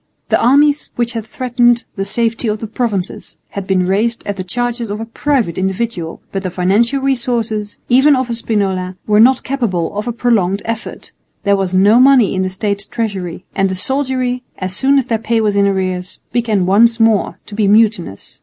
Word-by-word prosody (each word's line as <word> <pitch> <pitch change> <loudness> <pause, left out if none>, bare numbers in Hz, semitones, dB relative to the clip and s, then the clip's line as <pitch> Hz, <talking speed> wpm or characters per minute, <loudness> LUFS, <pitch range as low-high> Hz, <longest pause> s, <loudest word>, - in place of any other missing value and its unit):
The - - +2
armies 285 +4 +3
which 240 0 -1
had 225 -2 -5
threatened 240 -1 +1
the 195 -2 -3
safety 230 +3 -1
of 210 0 0
the 220 - -6
Provinces 215 -4 -4
had 200 -2 -6
been 185 -2 +1
raised 215 +5 0
at 205 - -3
the 185 - -5
charges 240 +3 -3
of 205 +1 -4
a 225 - -4
private 230 - -1
individual, 190 -3 -3
but 195 - -3
the 185 - -3
financial 200 +9 +1
resources, 235 -5 -1
even 270 +4 +5
of 260 -1 -1
a 235 - -3
Spinola, 190 -5 -2
were 210 0 +3
not 255 +3 +5
capable 220 -11 -2
of 210 +3 -3
a - - 0
prolonged 210 -5 0
effort; 230 0 -6 0.3
there 200 -1 +3
was 190 -2 -2
no 205 +5 +5
money 260 -5 +5
in 190 - -1
the 185 - -1
State 200 +1 -3
treasury; 190 -7 -4
and 195 0 +1
the 190 - -3
soldiery, 255 +2 -1 0.2
as 185 0 -4
soon 275 +5 +3
as 270 - +2
their 230 -3 -1
pay 225 +1 0
was 210 -2 +1
in 200 0 +3
arrears, 185 -2 -2
began 225 -6 0
once 230 +5 +4
more 225 -3 +2
to - - -12
be 210 -1 +1
mutinous. 205 - +1
220 Hz, 195 wpm, -16 LUFS, 195-240 Hz, 0.3 s, even